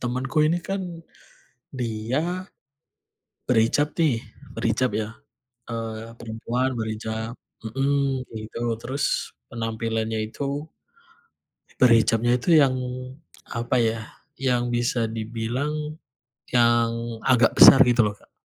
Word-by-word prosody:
Temen 125 +1 -2
ku 155 +2 +3
ini 165 +3 +2
kan, 180 -3 -5 0.7
dia 130 - -3 1.0
berhijab 125 +5 +2
nih, 155 -9 +2 0.4
berhijab 115 +3 +1
ya. 110 0 -2 0.6
Eee 115 0 -5
perempuan 120 +3 -2
berhijab 110 0 -4 0.3
mhm. 135 +2 0
Gitu. 110 +2 -6 0.2
Terus, 135 +3 -2 0.4
penampilannya 115 -1 -2
itu, 140 +5 -4 1.1
berhijabnya 120 0 +4
itu 125 - -3
yang 140 -4 +5 0.8
apa 120 +2 -1
ya, 115 0 0 0.4
yang 125 -2 +1
bisa 120 -1 0
dibilang, 125 +8 -3 0.5
yang 120 -1 +4 0.3
agak 125 -3 +4
besar. 135 - +10
Gitu 120 -2 +5
loh, 105 - -1
Kak. 105 - -24
120 Hz, 100 wpm, -24 LUFS, 115-135 Hz, 1.1 s, besar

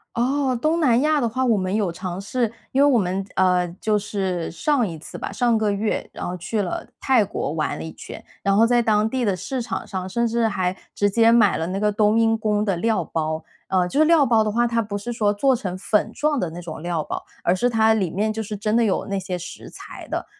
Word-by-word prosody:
哦， 260 +2 +1
东 315 +4 +1
南 250 -7 +4
亚 305 -1 +2
的 235 - +1
话， 260 +3 -1
我 230 -3 +3
们 185 0 -2
有 205 -5 0
尝 180 +1 -5
试。 230 +3 -1 0.2
因 270 - +2
为 - - +6
我 255 - +4
们 190 -1 -1
呃， 180 -1 +3
就 215 -1 +1
是 190 -4 -3
上 250 - +1
一 165 -2 -6
次 155 - -10
吧， - - -5
上 235 +2 +2
个 215 -1 +1
月， 210 +2 -2
然 - - -5
后 180 - -3
去 205 +5 -2
了 180 - -4
泰 255 -5 +3
国 185 -7 -3
玩 155 -1 -2
了 - - -6
一 160 - -7
圈。 - - -10 0.2
然 195 0 +2
后 225 - +5
在 240 0 +3
当 215 -1 +2
地 255 0 -1
的 200 -4 +1
市 255 +7 -4
场 235 - -4
上， 185 -1 -5
甚 235 +4 0
至 230 0 +1
还 185 -3 -1 0.2
直 205 0 +2
接 230 +2 +4
买 220 -5 +4
了 165 +1 -2
那 190 +2 -3
个 210 0 +2
冬 215 +1 +3
阴 225 0 +3
功 210 -1 0
的 195 -3 +1
料 215 -1 +1
包。 155 0 -2 0.2
啊， 185 -2 +1
就 280 - -1
是 310 - +6
料 330 -4 +5
包 225 -3 +4
的 215 - -1
话， 240 +3 +2
它 230 -1 +1
不 205 -1 -4
是 240 +4 -5
说 210 -3 +1
做 260 +5 +2
成 185 -5 -4
粉 210 +3 0
状 295 +1 0
的 180 - -1
那 170 +2 -8
种 160 -2 -7
料 170 -2 -2
包， - - -5 0.2
而 175 - +3
是 245 +6 +1
它 220 -1 +4
里 190 -6 0
面 215 +4 -1
就 220 - -3
是 210 -1 -5
真 215 +2 -1
的 235 - +4
有 205 - 0
那 200 -1 -2
些 185 -1 -4
食 170 - -9
材 - - -11
的。 - - -3
210 Hz, 275 characters per minute, -22 LUFS, 185-235 Hz, 0.2 s, 为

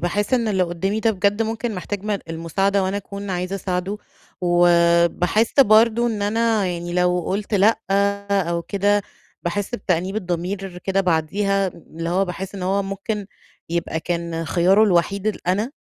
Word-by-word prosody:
باحس 205 +7 0
إن 235 -3 +1
اللي 190 -3 +2
قدامي 185 +5 -1
ده 225 - +3
بجد 205 +2 +1
ممكن 225 0 -3
محتاج 195 +2 -5
م 210 -2 -1
المساعدة، 195 +5 0
وأنا 190 +2 -1
أكون 200 0 -6
عايزة 180 +1 -2
أساعده، 185 +2 -3 0.4
وباحس 175 +3 +3
برضه 230 0 +5
إن 215 -3 -2
أنا 220 0 +1
يعني 175 -1 -4
لو 180 0 +2
قلت 205 +5 -3
لأ 210 +3 +4 0.5
أو 170 -4 0
كده، 205 +2 +1 0.4
باحس 205 +7 -2
بتأنيب 185 -2 -1
الضمير 180 0 -3
كده 195 0 +1
بعديها، 195 +3 +1
اللي 165 -1 -8
هو 190 +3 +2
باحس 190 +2 -6
إن 190 - -6
هو 195 +2 +1
ممكن 195 +1 -4 0.4
يبقى 165 -1 -2
كان 170 -1 -3
خياره 185 +5 +3
الوحيد 195 +1 +1
ال 215 -4 -3
أنا 210 +7 +1
195 Hz, 155 wpm, -21 LUFS, 175-205 Hz, 0.5 s, برضه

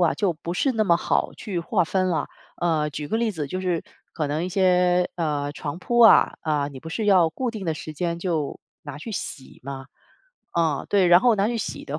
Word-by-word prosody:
啊， 170 -3 +4
就 200 -4 0
不 165 +2 -6
是 260 +9 +1
那 220 -2 +1
么 170 -3 +4
好 - - 0
去 195 -5 -5
划 180 +1 +1
分 185 +2 0
了。 170 -3 0 0.3
呃， 155 -3 +1
举 145 +2 -6
个 220 - 0
例 230 -1 +1
子， 155 -7 -4
就 185 +6 -4
是 180 -3 -1 0.3
可 155 - -2
能 150 +4 -2
一 - - -3
些， 180 -1 +3
呃， 150 -4 -1
床 150 +2 -5
铺 240 +5 0
啊， 225 - +7
啊， 150 -3 0
你 135 -2 -10
不 160 - -8
是 215 +4 -2
要 180 -5 +5
固 250 +7 -3
定 215 -4 -7
的 165 - 0
时 155 0 -7
间 170 +2 -2
就 165 -5 -2 0.2
拿 145 -1 -8
去 175 - -7
洗 135 -7 -7
吗？ 135 0 -7 0.7
啊， 160 -4 0
对， 195 -3 +3
然 175 +1 +7
后 240 0 +4
拿 200 0 +1
去 235 0 -2
洗 - - -5
的 150 +2 -4
175 Hz, 245 characters per minute, -24 LUFS, 150-190 Hz, 0.7 s, 啊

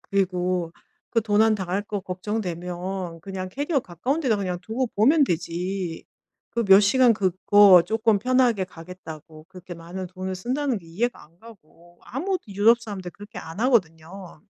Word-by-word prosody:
그리고 180 -3 -1 0.4
그 230 - +2
도난 215 +1 +3
당할 190 0 -2
거 205 -1 -4
걱정되면 180 -2 -5
그냥 185 0 -6
캐리어 285 - -1
가까운 245 - -3
데다 245 -7 +1
그냥 180 -3 -3
두고 235 +6 -2
보면 280 +8 +4
되지. 175 -1 -3 0.5
그 235 0 -1
몇 195 0 +7
시간 240 +4 +4
그거 190 -1 +5
쪼끔 220 0 +2
편하게 250 -3 +2
가겠다고 165 -3 -11
그렇게 180 -1 -10
많은 175 +3 -7
돈을 185 +1 -5
쓴다는 255 +4 -2
게 170 - -18
이해가 225 +10 -3
안 165 +3 -21
가고 175 -5 -18
아무도 365 +9 -3
유럽 215 +4 +4
사람들 195 -5 -7
그렇게 205 +4 -13
안 165 +6 -8
하거든요. 185 -6 -1
195 Hz, 325 characters per minute, -24 LUFS, 180-225 Hz, 0.5 s, 몇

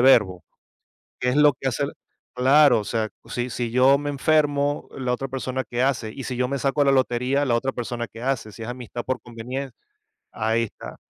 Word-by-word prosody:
verbo. 105 -9 +4 0.7
¿Qué 125 0 +1
es 135 - 0
lo 150 -2 +6
que 135 - -1
hace 130 +3 -1
el? 140 - -4 0.4
Claro, 130 -1 +5
o - - -6
sea, 110 0 -1 0.2
si 120 +1 -3
si 120 -1 -3
yo 130 +3 +5
me 145 +1 -3
enfermo, 145 0 +1
¿la 125 -1 0
otra 135 +2 -4
persona 130 0 -3
que 120 +1 -2
hace? 120 -5 0
Y, 135 - -7
¿si 125 - -4
yo 125 - +1
me 140 +2 -2
saco 135 +2 +1
a - - +4
la 140 - +4
lotería, 130 +2 +1
la 120 - +2
otra 135 +3 0
persona 120 -1 -4
qué 115 +3 -12
hace? 120 -5 -2
Si 100 - -13
es 110 - -6
amistad 120 -1 -6
por 130 0 -2
convenien 125 +3 -6 0.6
Ahí 110 +1 0
está. 110 - -8
125 Hz, 215 wpm, -24 LUFS, 120-135 Hz, 0.7 s, lo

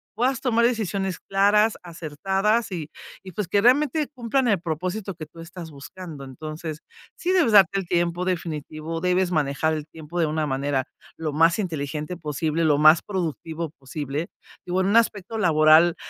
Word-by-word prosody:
puedas 250 +3 0
tomar 235 -3 +2
decisiones 200 -6 -1
claras, 205 +3 +3
acertadas 190 +7 -1
y 160 -4 -5 0.3
y 185 - -9
pues 205 +1 -3
que 200 +4 +2
realmente 290 +5 +3
cumplan 250 0 0
el 200 -4 +3
propósito 180 +4 -3
que 155 -1 -7
tú 155 +2 -17
estás 165 0 -9
buscando. 150 +1 -9
Entonces, 155 +3 -7 0.4
sí 365 - -1
debes 335 - +3
darte 195 -1 +6
el 190 - -6
tiempo 175 0 0
definitivo, 165 -2 -3
debes 180 0 +1
manejar 155 0 +1
el 155 -1 -4
tiempo 160 +2 -7
de 165 - +3
una 155 0 -1
manera 135 -1 -1 0.3
lo 155 -2 -3
más 165 +3 +4
inteligente 155 -2 -3
posible 155 +1 -1
lo 150 -2 +4
más 155 +2 +7
productivo 165 -3 -4
posible 145 +3 -4 0.4
y - - -5
bueno 185 +1 +1
un 215 - +5
aspecto 225 -2 +1
laboral 160 -2 +5
170 Hz, 165 wpm, -24 LUFS, 155-200 Hz, 0.4 s, más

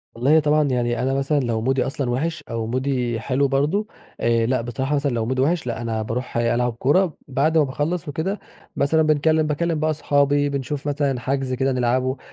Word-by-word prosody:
والله 140 +7 +4
طبعًا 150 0 +3
يعني 120 -3 0
أنا 130 +1 0
مثلًا 140 +2 +1
لو 115 -4 -1
مودي 130 +2 +1
أصلًا 135 -2 -2
وِحِش، 155 +4 -2
أو 115 -1 -2
مودي 125 -2 -1
حلو 135 +4 +1
برضو، 150 +11 0 0.3
آآ 115 -1 +2
لأ 125 0 +1
بصراحة 130 +5 -2
مثلًا 140 -1 0
لو 115 -2 -1
مودي 130 +2 0
وِحِش 150 -1 +1
لأ 120 0 -3
أنا 115 -1 -2
باروح 115 +3 -4
ألعب 120 0 +1
كورة، 150 +8 +1
بعد 145 +4 +1
ما 155 - +5
باخلص 150 +5 -2
وكده 160 +8 -2 0.4
مثلًا 160 +3 +2
بنكلم 155 +1 +2
باكلّم 160 +1 -1
بقى 155 +1 +1
اصحابي، 145 -1 +2
بنشوف 140 +1 -3
مثلًا 140 -3 0
حجز 135 0 -2
كده 135 +1 +1
نلعبه 130 +1 0
135 Hz, 190 wpm, -22 LUFS, 125-150 Hz, 0.4 s, ما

